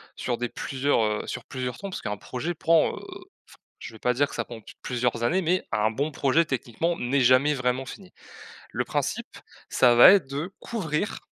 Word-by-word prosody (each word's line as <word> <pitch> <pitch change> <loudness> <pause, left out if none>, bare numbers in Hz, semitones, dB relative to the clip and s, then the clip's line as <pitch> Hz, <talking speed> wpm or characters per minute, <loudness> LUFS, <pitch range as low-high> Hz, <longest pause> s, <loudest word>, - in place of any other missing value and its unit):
sur 120 - -2
des 120 - -2
plusieurs 135 -2 0
heu, 105 0 -1
sur - - -5
plusieurs 125 -1 -5
tons. 200 - -6
Parce - - -6
qu'un 105 - -3
projet 155 +12 -4
prend, 165 0 +3
heu, - - -8
f 375 -1 -11 0.6
je - - -9
vais 110 - -12
pas 125 - +2
dire 145 +3 +2
que - - -10
ça - - -2
prend 120 -2 -10
p - - -13
plusieurs 125 -2 -1
années, 180 +9 +2
mais 180 +3 +1
un 105 +1 +2
bon 140 +7 -2
projet 145 +3 +2
techniquement 155 +4 -2
n'est 130 +3 0
jamais 130 +4 +4
vraiment 130 0 -1
fini. 185 +6 -11 0.6
Le - - -1
principe - - -2 0.4
ça 120 -2 +4
va 120 - +10
être 175 -10 +3
de 150 +7 -4
couvrir 205 -4 -3
135 Hz, 205 wpm, -26 LUFS, 125-165 Hz, 0.6 s, va